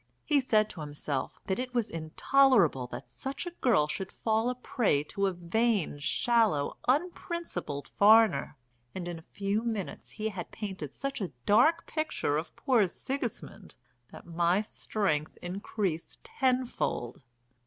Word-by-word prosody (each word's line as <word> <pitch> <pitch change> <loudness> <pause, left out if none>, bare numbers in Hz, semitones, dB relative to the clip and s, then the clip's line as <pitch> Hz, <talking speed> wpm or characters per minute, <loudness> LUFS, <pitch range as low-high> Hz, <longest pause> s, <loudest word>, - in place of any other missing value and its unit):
He 295 -2 +4
said 215 -5 +3
to 165 - -8
himself 145 -2 -4
that 190 - -1
it 255 0 -4
was 235 -3 0
intolerable 165 - +3
that - - -8
such 270 +6 -6
a 350 - -4
girl 185 - +4
should 190 +5 -4
fall 220 +1 0
a 250 - -2
prey 225 - +1
to 200 +6 -1
a - - +1
vain, 185 -1 0
shallow, 210 -2 +2
unprincipled 340 - -1
foreigner, 210 -9 +5 0.4
and 180 -2 -4
in 175 -2 -5
a 160 - -21
few 200 +2 0
minutes 220 -5 -4
he 220 0 -3
had 190 -5 -6
painted 190 -9 -6
such 275 - -4
a 190 - -3
dark 315 +11 +4
picture 310 - -1
of 160 - -5
poor 240 -8 +3
Sigismund 230 -2 -5 0.3
that - - -12
my 175 +3 +2
strength 190 -8 -2
increased 185 -2 -4
tenfold. 250 - -1
205 Hz, 145 wpm, -30 LUFS, 165-245 Hz, 0.4 s, foreigner